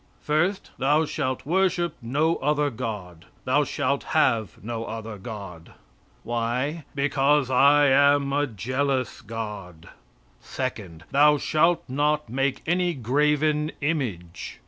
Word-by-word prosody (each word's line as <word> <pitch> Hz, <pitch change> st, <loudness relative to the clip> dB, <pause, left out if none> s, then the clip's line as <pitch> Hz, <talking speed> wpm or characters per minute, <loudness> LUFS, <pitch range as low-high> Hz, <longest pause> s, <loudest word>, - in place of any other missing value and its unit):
First, 175 Hz, +6 st, 0 dB
"Thou 145 Hz, +4 st, +3 dB
shalt 130 Hz, -3 st, -3 dB
worship 175 Hz, 0 st, +1 dB
no 150 Hz, +8 st, +1 dB
other 150 Hz, +1 st, +1 dB
God; 105 Hz, -8 st, -6 dB, 0.2 s
thou 145 Hz, +4 st, +3 dB
shalt 140 Hz, -1 st, -1 dB, 0.2 s
have 115 Hz, -8 st, +2 dB
no 115 Hz, +1 st, -4 dB
other 110 Hz, -1 st, -7 dB
God." 95 Hz, -6 st, -9 dB, 0.5 s
Why? 125 Hz, +6 st, -2 dB
"Because 140 Hz, -1 st, +2 dB
I 145 Hz, +3 st, +5 dB
am 140 Hz, 0 st, +4 dB
a 145 Hz, +1 st, +1 dB
jealous 130 Hz, +3 st, -2 dB
God." 105 Hz, -7 st, -7 dB, 0.5 s
Second, 100 Hz, -11 st, -5 dB
"Thou 150 Hz, +1 st, +5 dB
shalt 165 Hz, +4 st, +2 dB
not 145 Hz, +1 st, 0 dB
make 135 Hz, +2 st, -1 dB
any 175 Hz, 0 st, +1 dB
graven 150 Hz, +4 st, +1 dB
image." 120 Hz, -, -3 dB
135 Hz, 115 wpm, -25 LUFS, 115-150 Hz, 0.5 s, I